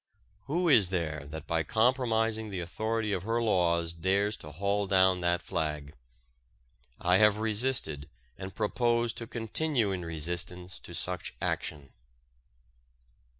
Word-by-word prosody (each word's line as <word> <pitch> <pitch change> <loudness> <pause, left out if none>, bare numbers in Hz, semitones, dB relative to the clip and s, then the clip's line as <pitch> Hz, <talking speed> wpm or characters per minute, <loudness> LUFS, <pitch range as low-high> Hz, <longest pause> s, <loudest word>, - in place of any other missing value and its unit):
Who 175 +5 0
is 110 - +6
there 80 -6 -2
that 80 +2 -7
by 80 -1 0
compromising 110 - +1
the 95 -2 -4
authority 110 +5 -2
of 95 - -1
her 115 +5 0
laws 85 -6 +1
dares 100 +5 +1
to 75 - -10
haul 100 +4 -1
down 95 -1 +4
that 85 0 +1
flag? 75 -5 -3 1.1
I 90 +1 +4
have 105 0 +5
resisted 110 - 0 0.3
and 95 0 -8
propose 120 +1 +1
to 115 - -5
continue 115 0 0
in 90 -2 -3
resistance 85 +3 -2
to - - -9
such - - -2
action. 70 -3 -3
95 Hz, 130 wpm, -30 LUFS, 85-110 Hz, 1.1 s, is